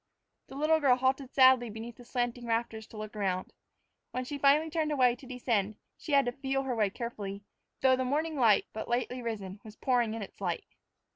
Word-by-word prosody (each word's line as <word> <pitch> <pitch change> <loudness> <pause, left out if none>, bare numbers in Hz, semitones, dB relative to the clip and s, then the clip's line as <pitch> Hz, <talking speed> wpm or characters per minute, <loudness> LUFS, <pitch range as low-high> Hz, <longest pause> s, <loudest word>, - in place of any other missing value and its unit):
The - - -11
little 310 +3 +3
girl 270 -4 +5
halted 260 +1 0
sadly 260 -3 +6
beneath 225 +2 -8
the 245 - -12
slanting 245 -1 -2
rafters 225 -1 -2
to 220 - -12
look 215 0 -6
round. 190 -3 -2 0.6
When 255 0 -3
she 285 +2 -5
finally 295 +3 +4
turned 315 -1 0
away 250 -4 +4
to 255 +1 -14
descend, 230 -5 -1 0.2
she 300 - -6
had 275 -1 +5
to 245 - 0
feel 270 +1 -2
her 265 -2 -2
way 215 -3 +2
carefully, 205 -3 -6 0.4
though 260 -1 +5
the 260 - -1
morning 305 +4 -1
sun, 220 -5 +5
but 220 - -5
lately 250 +1 -1
risen, 205 -4 -5
was 215 -1 -11
pouring 240 -4 +1
in 225 - -4
its 200 - -12
light. 175 -3 -2
245 Hz, 205 wpm, -30 LUFS, 220-270 Hz, 0.6 s, sadly